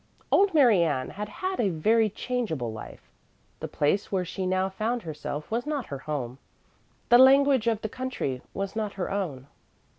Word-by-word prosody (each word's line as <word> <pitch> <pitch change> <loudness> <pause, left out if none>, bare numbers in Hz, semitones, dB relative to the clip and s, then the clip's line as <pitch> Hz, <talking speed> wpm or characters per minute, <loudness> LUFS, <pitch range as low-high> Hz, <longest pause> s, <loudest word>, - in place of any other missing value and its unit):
Old 395 -3 +4
Mary 240 - +6
Ann 145 -6 0
had 210 +1 -6
had 375 0 -4
a 215 -5 +2
very 215 +7 +2
changeable 190 - -3
life. 110 - -10 0.6
The - - -4
place 170 +8 0
where 185 -2 0
she 185 +1 -4
now 185 +1 +1
found 220 +5 -2
herself 150 0 -6
was 240 +5 -2
not 290 -4 -2
her 140 - -4
home. 135 -4 -4 0.7
The 240 - +7
language 265 -2 +6
of 225 -2 +1
the - - 0
country 220 - -4
was 195 +1 -3
not 215 -2 -2
her 190 -1 -4
own. 165 -10 -3
200 Hz, 175 wpm, -27 LUFS, 155-240 Hz, 0.7 s, The